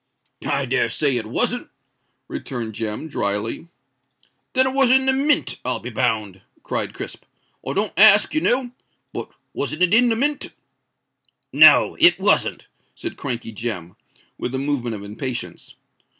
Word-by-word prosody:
"I - - 0
dare - - 0
say 140 -4 +1
it 110 -2 -4
wasn't," 110 - -1 0.6
returned 115 -4 -6
Jem, 110 +6 -5
drily. 105 +2 -2 0.9
"Then 260 0 +5
it 260 - -1
was 270 -2 +3
in 265 +1 +4
the 265 - +3
Mint, 285 +2 +1
I'll 125 - -1
be 125 - -8
bound," 110 -6 -1 0.2
cried - - -3
Crisp. - - -8 0.5
"I - - -2
don't 205 +1 -1
ask, 210 +3 +7
you 310 - +1
know—but 250 -2 -4 0.2
wasn't 155 +5 -2
it 180 +2 +3
in 240 +2 +5
the 225 - +1
Mint?" 285 +5 -1 1.0
"No—it - - +6
wasn't," - - +1 0.3
said 340 - -6
Crankey 120 -5 -5
Jem, 100 -6 -5 0.4
with 125 - -4
a - - -1
movement 130 -4 -2
of 100 - -8
impatience. 120 +4 -6
140 Hz, 145 wpm, -21 LUFS, -, 1.0 s, ask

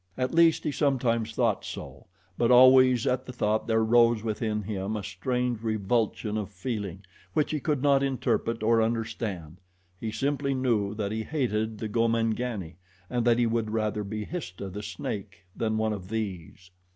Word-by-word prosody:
At 130 +3 -1
least 165 -1 +4
he 150 - -1
sometimes 120 -6 0
thought 115 -5 +1
so, - - -8 0.3
but 115 +3 +1
always 130 -1 +7
at 130 0 0
the - - -5
thought 110 -2 0
there 110 -1 +2
rose 115 -1 +4
within 110 -1 -2
him 100 +1 -3
a 105 - -5
strange 125 -2 -2
revulsion 110 0 -1
of 105 - -5
feeling, 100 -2 -5 0.3
which 150 -2 +1
he 155 - -1
could 145 -2 -1
not 140 -1 +4
interpret 120 -4 -1
or 115 +1 +4
understand 110 -7 -3 0.4
he 110 - -3
simply 140 +4 -1
knew 110 -6 0
that 105 -2 -2
he 110 0 -2
hated 110 -5 -1
the 110 - -4
Gomangani, 115 -4 -1 0.3
and 120 -1 0
that 120 -1 +4
he 120 - +3
would 115 -1 0
rather 110 -1 -1
be 105 +1 -4
Histah, 100 - -6
the 105 +3 -6
snake, 100 -1 -6
than 110 -1 -1
one 110 0 +1
of 95 -3 -7
these. 95 -4 -5
110 Hz, 170 wpm, -27 LUFS, 105-125 Hz, 0.4 s, always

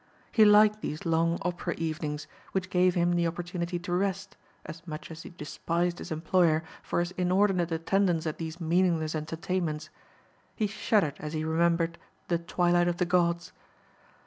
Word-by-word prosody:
He 220 -3 +6
liked 210 +1 +6
these 150 - -5
long 165 +1 +2
opera 175 0 -2
evenings, 155 -2 -3 0.3
which 185 -1 -2
gave 180 0 +3
him 175 0 +2
the 170 -1 +2
opportunity 175 +1 -3
to 175 0 -4
rest, 195 +1 -1 0.3
as 165 - -8
much 155 +1 -7
as 165 0 -8
he - - -9
despised 170 +2 -2
his - - -8
employer 160 0 +2 0.2
for - - -1
his 175 +1 -2
inordinate 180 -1 +2
attendance 170 +1 +1
at 155 - -3
these 165 +1 -5
meaningless 165 -2 +1
entertainments. 160 0 -3 0.6
He 215 - 0
shuddered 205 -6 +1
as 150 0 -6
he 155 0 -2
remembered 170 +1 +1 0.3
"The 170 -1 +2
Twilight 175 0 +2
of 175 -1 0
the 180 - +1
Gods." 170 -1 +1
170 Hz, 160 wpm, -28 LUFS, 165-180 Hz, 0.6 s, He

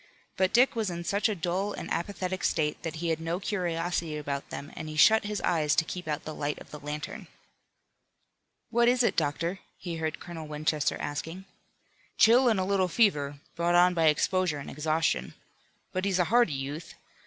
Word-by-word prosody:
But 190 0 +2
Dick 245 +2 +4
was 220 -4 0
in 170 -1 -4
such 200 +5 +1
a 215 - -1
dull 185 +4 -1
and - - -6
apathetic 185 0 -3
state 150 -2 0
that 165 -1 -4
he 170 +1 -2
had 160 0 -1
no 165 +2 -2
curiosity 175 -4 -2
about 140 -2 -4
them 145 - -7
and 155 - -6
he 155 - -6
shut 220 +8 +6
his 210 0 -2
eyes 155 -4 +2
to 165 - +3
keep 180 0 -6
out 150 -1 -2
the 155 - -5
light 145 0 -2
of - - -14
the 150 - -8
lantern. 150 +1 -6 1.4
"What 235 0 +4
is 250 0 +4
it, - - +2
doctor?" 165 +4 -1 0.2
he 170 -2 -5
heard 160 -1 -3
Colonel 165 -3 -8
Winchester 150 0 0
asking. 165 +6 -5 0.7
"Chill 245 +3 +6
and 215 -4 +2
a - - +1
little 195 -1 +2
fever, 150 -8 +2 0.2
brought 170 +1 +1
on 180 +1 +6
by 165 -2 +2
exposure 175 +1 +2
and 140 - -7
exhaustion. 155 - 0 0.6
But 185 +1 -1
he's 195 -2 +1
a 180 - +4
hardy 240 -10 +5
youth. 140 +4 -5
170 Hz, 190 wpm, -28 LUFS, 150-190 Hz, 1.4 s, shut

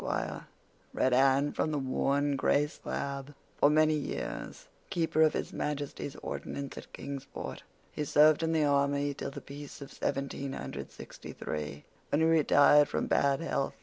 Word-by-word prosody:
'" - - -34
read 130 - +2
Anne 135 +2 +4
from 155 -1 -1
a - - +1
worn, 140 +1 +1
gray 140 +2 +3
slab, 140 -1 -5 0.2
"'for 145 - +6
many 155 +1 +4
years 155 - -4 0.2
Keeper 165 -4 +1
of 155 -1 +5
His - - -3
Majesty's 145 -1 -3
Ordnance 140 -1 -5
at - - -10
Kingsport. 140 -1 -6 0.3
He 150 - -3
served 150 +2 +5
in 165 0 +1
the 160 -2 +2
army 140 0 +2
till 140 - -5
the 140 - -8
peace 145 0 -9
of 140 - -9
1763, 130 - -5 0.3
when 145 - +2
he - - +5
retired 145 -2 +6
from - - -1
bad 140 +1 +2
health. 140 -4 -1
145 Hz, 150 wpm, -30 LUFS, 140-150 Hz, 0.3 s, for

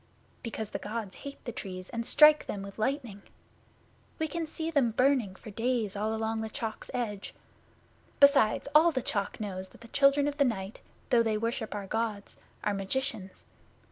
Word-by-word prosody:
'Because 220 -3 -5
the - - -3
Gods 210 -3 -5
hate 280 -1 -9
the 240 - -3
Trees 185 -5 -7
and 235 0 -3
strike 300 0 +7
them 200 -1 -4
with 200 +2 -10
lightning. 235 -4 -2 1.0
We 315 - -1
can 330 +1 -3
see 320 +1 -3
them 280 -6 +3
burning 250 -4 +2
for 215 - -11
days 225 -2 -1
all 215 +2 -1
along 220 0 -1
the 220 - -4
Chalk's 220 0 -5
edge. 210 -5 -4 0.8
Besides, 280 -4 +5
all 320 +3 +7
the 260 -5 -2
Chalk 200 -2 -2
knows 190 -3 -5
that - - -19
the 230 - -11
Children 280 +2 +4
of 290 0 -3
the 285 - +5
Night, 195 -4 -3 0.3
though 240 -2 +6
they 220 -2 +1
worship 230 0 -2
our 205 -1 -4
Gods, 215 0 -3 0.3
are 210 - +1
magicians. 195 -1 -3
225 Hz, 175 wpm, -30 LUFS, 205-270 Hz, 1.0 s, strike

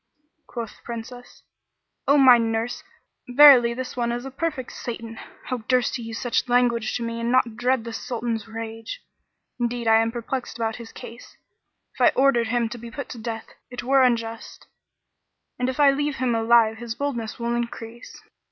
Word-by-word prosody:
Quoth 230 -3 -7
the - - -25
Princess, 240 +1 -9 0.6
"O 285 - +5
my 255 -3 +8
nurse, 225 +2 -2 0.5
verily 250 -2 +8
this 250 +1 -5
one 235 -1 -1
is 240 +2 -4
a 270 - -6
perfect 275 -3 -3
Satan! 230 -1 -7 0.2
How 255 - -3
durst 255 0 +2
he - - -8
use 225 -1 -6
such 245 0 -1
language 240 -2 +2
to 240 - -5
me 230 0 -4
and 230 +1 -1
not 250 -3 +2
dread 245 0 +1
the 230 0 -7
Sultan's 230 -2 -3
rage. 225 - -7 0.6
Indeed, 240 -1 -2
I 225 0 +6
am 225 0 0
perplexed 240 +1 -4
about 225 -1 -2
his 235 -2 -10
case: 235 +1 -12 0.6
if - - -9
I - - +7
order 265 -4 +4
him 235 +1 0
to 240 +1 -7
be 235 +1 -9
put 280 +3 -7
to 240 - -8
death, 225 0 -6 0.2
it 245 - -6
were 270 +2 +4
unjust; 230 -2 -1 0.9
and 250 +1 0
if 260 - -5
I 285 -1 +7
leave 290 +1 -1
him 255 -2 0
alive 225 -1 +4
his 235 0 -6
boldness 240 -6 -3
will 235 0 -2
increase." 235 0 -6
235 Hz, 180 wpm, -24 LUFS, 230-255 Hz, 0.9 s, my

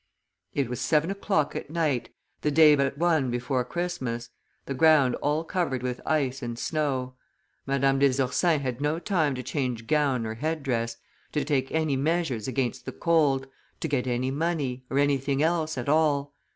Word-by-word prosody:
It 140 -3 +1
was 125 0 -4
seven 160 +3 +2
o'clock 195 -6 0
at - - -5
night, 155 -6 0 0.3
the 150 - +1
day 150 0 +7
but 140 0 0
one 160 -5 +2
before 125 +1 -1
Christmas, 125 -7 -4 0.3
the 140 - -3
ground 145 -2 +5
all 150 +2 +1
covered 160 -7 -2
with 125 -1 -3
ice 135 -4 0
and 120 -2 -4
snow; 130 -3 -1 0.5
Madame 135 0 +2
des 135 -1 +3
Ursins 140 +3 +2
had 130 0 -3
no 150 +2 +1
time 165 -6 0
to 125 - -5
change 125 -3 -2
gown 140 -4 +1
or 110 - -3
head 155 +6 -3
dress, 115 -3 -1 0.4
to 150 -3 0
take 135 -3 0
any 155 -3 +1
measures 145 -6 0
against 130 -2 -2
the - - -2
cold, 150 -6 +2 0.3
to - - -2
get 135 -4 -1
any 125 +1 0
money, 140 -4 -2
or 135 - -1
any 145 0 +4
anything 135 +1 0
else 160 -2 0
at 125 - -4
all." 145 -2 +2
140 Hz, 180 wpm, -27 LUFS, 130-155 Hz, 0.5 s, day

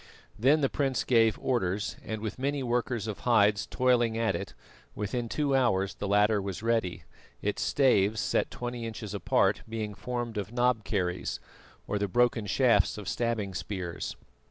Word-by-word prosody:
Then 140 +7 +4
the 135 - +3
prince 135 -3 0
gave 115 -3 +3
orders, 105 -5 -1
and, 110 -1 -4
with 110 +2 -4
many 140 +1 -1
workers 120 -2 -1
of 110 -3 -5
hides 105 -4 +3
toiling 120 -3 +2
at 115 -1 +1
it, 95 -10 -6 0.4
within 115 +3 -3
two 145 0 +1
hours 100 -7 +2
the 100 - -5
ladder 105 +1 +3
was 100 +1 -5
ready, 115 -6 0 0.4
its 105 - -1
staves, 110 -6 +3
set - - 0
twenty 120 -1 -5
inches 110 -2 -6
apart, 100 -4 +2
being 110 -2 -3
formed 120 0 -4
of 105 +1 -5
knob 120 -2 +1
kerries, 90 -3 -2 0.5
or 105 - -2
the 100 - 0
broken 120 0 +2
shafts 125 +3 +3
of 105 - -7
stabbing 115 -5 -1
spears. 90 -1 -4
110 Hz, 160 wpm, -29 LUFS, 100-120 Hz, 0.5 s, Then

